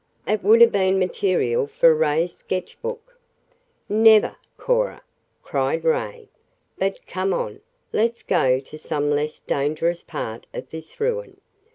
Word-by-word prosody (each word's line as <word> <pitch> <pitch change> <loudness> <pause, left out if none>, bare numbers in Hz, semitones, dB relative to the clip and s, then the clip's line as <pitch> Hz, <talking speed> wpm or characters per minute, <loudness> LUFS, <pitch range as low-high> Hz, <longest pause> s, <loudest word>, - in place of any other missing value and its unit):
"It 215 -1 0
would 220 +4 +6
have 235 - +8
been 190 -1 +2
material 180 -9 0
for 165 +2 +4
Ray's 160 +2 0
sketchbook." 475 - -6 0.7
"Never, 220 0 +5 0.2
Cora!" - - 0 0.4
cried 485 - -1
Ray. 480 -2 -1 0.5
"But 195 +1 -2
come 190 +1 -1
on. - - -4 0.3
Let's 235 +2 0
go 130 0 +2
to 150 +3 -12
some 145 -2 -1
less 150 +1 -1
dangerous 155 +5 -1
part 115 -8 -6
of - - -7
this 160 - -10
ruin. 480 +2 -2
190 Hz, 130 wpm, -22 LUFS, 155-235 Hz, 0.7 s, have